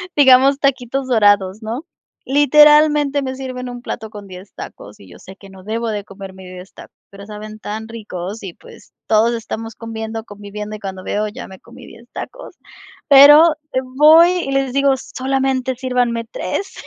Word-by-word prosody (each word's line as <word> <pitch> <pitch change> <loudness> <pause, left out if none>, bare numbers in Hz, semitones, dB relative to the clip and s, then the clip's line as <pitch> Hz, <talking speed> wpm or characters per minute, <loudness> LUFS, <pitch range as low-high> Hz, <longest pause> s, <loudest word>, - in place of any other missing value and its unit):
digamos 270 0 +5
taquitos 265 -1 -1
dorados, 205 -3 +2
¿no?, 235 +9 -6 0.4
literalmente 295 0 +4
me 260 0 -4
sirven 255 -1 -7
un 245 0 -8
plato 220 -2 -7
con 205 -2 -11
10 185 +1 -12
tacos 105 +1 -11
y 95 -2 -16
yo 90 - -14
sé 190 - -13
que 195 - -15
no 190 -1 -15
debo 230 +3 -3
de 210 -2 -4
comerme 190 -1 -11
10 180 +1 -11
tacos, - - -15
pero 200 0 -12
saben 215 +1 -9
tan 220 +2 -6
ricos 210 -2 -8
y, 185 - -7
pues, - - -18
todos 225 +2 +2
estamos 225 -1 -6
comiendo, 225 -1 -6
conviviendo 205 0 -8
y - - -10
cuando 190 -2 -7
veo, 210 +2 -2
ya 210 - -9
me 190 -1 -13
comí 235 - -15
10 235 +1 -16
tacos - - -9 0.5
pero 295 +3 +8 0.4
voy 320 +4 +7
y 345 -7 -3
les 270 -1 0
digo 275 0 +2
solamente 265 0 -2
sírvanme 245 -2 -1
3. 385 - -5
230 Hz, 170 wpm, -18 LUFS, 205-270 Hz, 0.5 s, pero